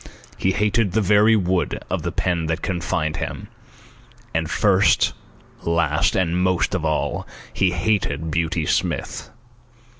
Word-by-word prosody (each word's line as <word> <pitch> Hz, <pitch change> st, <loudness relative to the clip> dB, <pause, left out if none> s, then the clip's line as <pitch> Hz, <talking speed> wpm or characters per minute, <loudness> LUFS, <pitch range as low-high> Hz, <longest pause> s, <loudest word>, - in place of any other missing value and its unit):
He 95 Hz, -, 0 dB
hated 105 Hz, -1 st, +1 dB
the 110 Hz, -, +2 dB
very 105 Hz, +3 st, +5 dB
wood 95 Hz, -3 st, 0 dB
of -, -, -2 dB
the -, -, -3 dB
pen 85 Hz, -3 st, -1 dB
that 80 Hz, +1 st, -2 dB
confined 85 Hz, -4 st, -1 dB
him. -, -, -5 dB, 0.8 s
And, 80 Hz, -1 st, -1 dB
first, 100 Hz, +2 st, +3 dB, 0.5 s
last, 85 Hz, -2 st, +1 dB
and 90 Hz, -1 st, +1 dB
most 95 Hz, 0 st, +1 dB
of 95 Hz, -4 st, -1 dB
all, 80 Hz, -1 st, -1 dB, 0.3 s
he 95 Hz, -, +2 dB
hated 85 Hz, -4 st, -1 dB
Beauty 80 Hz, 0 st, 0 dB
Smith. -, -, -2 dB
90 Hz, 130 wpm, -22 LUFS, 80-95 Hz, 0.8 s, very